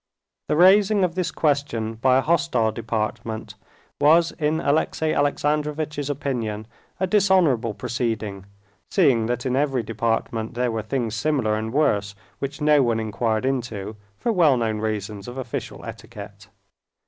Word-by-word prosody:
The - - +1
raising 195 +4 +5
of 180 -2 +1
this 185 -1 -1
question 140 -7 0
by 130 +3 +3
a - - +3
hostile 150 -8 +1
department 110 0 -4 0.5
was 165 +3 +5
in 155 +1 +1
Alexey 155 +1 0
Alexandrovitch's 150 0 -1
opinion 120 -7 -3 0.3
a 190 - +2
dishonorable 180 - +3
proceeding, 110 -5 -3 0.4
seeing 130 - +3
that 120 +1 -2
in 130 -1 0
every 135 -3 +1
department 115 +1 -2
there 125 0 0
were 110 -1 -2
things 115 0 -2
similar 120 -2 0
and 110 +1 -2
worse, 105 -8 +1 0.2
which 140 +2 -5
no 150 -1 +5
one 115 -3 +1
inquired 110 +1 -1
into, 115 -6 -3 0.2
for 235 - -1
well 165 - +4
known 110 -2 -1
reasons 105 -2 -4
of 120 +2 -8
official 130 -3 -5
etiquette. - - -10
125 Hz, 140 wpm, -23 LUFS, 110-150 Hz, 0.5 s, raising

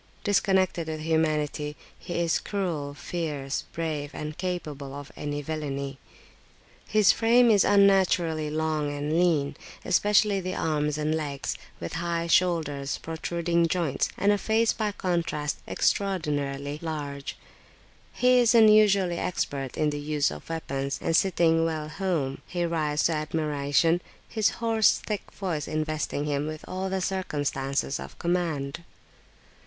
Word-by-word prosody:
Disconnected 190 -4 +2
with 155 -1 -4
humanity, 155 -2 0 0.2
he 175 - -5
is 170 -1 +2
cruel, 165 -8 -3
fierce, 145 -5 -3
brave, 155 -3 -3
and 150 0 -5
capable 150 -7 -4
of 145 0 -8
any 145 0 -4
villany. 140 -3 -4 0.9
His 215 -2 +5
frame 235 +1 +4
is 205 -2 +5
unnaturally 185 -6 +3
long 155 -1 -1
and 145 +1 -2
lean, 155 -6 +2 0.3
especially 205 +2 +3
the 185 0 -3
arms 150 -1 0
and 155 0 0
legs, 145 -3 -3 0.2
with 85 - -5
high 170 -1 -1
shoulders, 160 -5 +1
protruding 170 +1 -1
joints, 165 -5 0
and 200 +1 +3
a 205 - +2
face 225 +2 +2
by 215 -2 -1
contrast 170 -6 -2
extraordinarily 145 -7 -1
large; 145 -4 -5 0.7
he 250 0 +4
is 240 -1 +4
unusually 210 -5 +5
expert 140 -7 -3
in 150 -1 +2
the 145 - -4
use 150 0 0
of 75 0 -9
weapons, 140 -4 -3
and 165 - 0
sitting 165 -3 +3
well 155 -2 -2
"home," 155 -7 -2
he 175 -1 -1
rides 155 -3 0
to - - +3
admiration, 155 +1 +1 0.3
his 220 -2 +2
hoarse, 225 -2 +2
thick 210 -2 -4
voice 170 -7 -3
investing 155 -1 -2
him 145 0 -1
with 155 0 -6
all 185 +1 -3
the 190 0 -1
circumstances 145 -6 -1
of - - -9
command. 170 -5 -1
160 Hz, 135 wpm, -27 LUFS, 145-185 Hz, 0.9 s, His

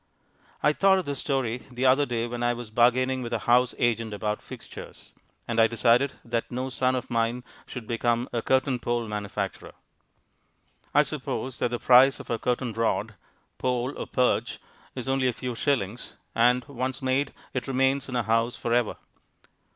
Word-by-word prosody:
I 150 - +4
thought 195 +3 +4
of 185 - -2
this 140 -2 -3
story 130 -4 -1
the 125 +1 -2
other 135 +2 +4
day 115 -1 -1
when 120 0 -5
I 120 0 +2
was 120 -2 -8
bargaining 130 +3 +3
with 120 -1 -5
a - - +2
house 125 +1 +4
agent 115 -3 0
about 105 0 -2
"fixtures," - - -11 0.3
and 115 -1 0
I 115 - +6
decided 120 +4 +3
that 115 -1 -2
no 130 +2 -3
son 130 +1 +1
of 130 0 -4
mine 115 +1 0 0.2
should 125 -3 -7
become 120 +1 0
a 120 - 0
curtain 130 +1 +1
pole 120 -1 -1
manufacturer. 105 -2 -4 1.2
I 150 - +5
suppose 135 -4 -4
that - - +1
the 120 - -2
price 130 +3 +6
of - - -8
a 115 - 0
curtain 125 -1 -1
rod 115 +1 0 0.5
(pole 125 +1 -1
or - - -5
perch) 125 -1 +1 0.4
is 125 0 -5
only 135 -1 +2
a 125 - +1
few 125 +1 -4
shillings, 120 -3 -1 0.2
and, 120 +2 +3
once 130 0 -4
made, 130 +2 +1 0.2
it 130 0 -3
remains 135 +1 +1
in 125 - -4
a 120 - +1
house 115 +2 +1
for 115 - -2
ever. 120 -3 +2
125 Hz, 180 wpm, -26 LUFS, 115-130 Hz, 1.2 s, I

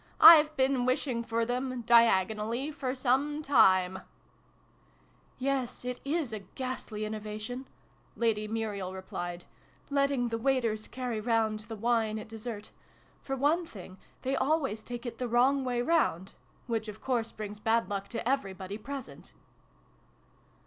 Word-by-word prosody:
" - - -33 0.2
I've 305 -1 +2
been 260 -1 +2
wishing 255 -2 0
for 230 0 0
them 250 +1 -2
diagonally 230 +3 +3
for 265 -3 -3
some 280 +4 +1
time! 190 -9 +4 0.5
" - - -35
" - - -34 0.3
Yes, 260 -2 -2
it 250 0 -3
is 285 -4 -1
a 215 - -3
ghastly 215 +1 -5
innovation," 215 +4 -5 0.5
Lady 215 -2 0
Muriel 210 -4 -3
replied, 175 -2 -6 0.3
" - - -32
letting 275 -3 +2
the 230 0 -2
waiters 230 -4 0
carry 245 -4 -3
round 220 -1 +1
the 225 - -4
wine 225 -1 +1
at 215 - -7
dessert. 220 -1 -7 0.5
For 270 - -3
one 295 +6 +2
thing, 190 - -11 0.2
they 265 +1 0
always 270 -7 0
take 240 +2 -7
it 235 -1 -6
the 250 - -1
wrong 260 +4 +3
way 245 -1 0
round 245 - +1 0.3
which 225 -3 -2
of 210 0 -8
course 235 -3 -1
brings 210 -1 -7
bad 225 +2 +2
luck 200 -1 -3
to 230 +1 -4
everybody 200 -6 -2
present 225 - -8
235 Hz, 150 wpm, -30 LUFS, 215-260 Hz, 0.5 s, time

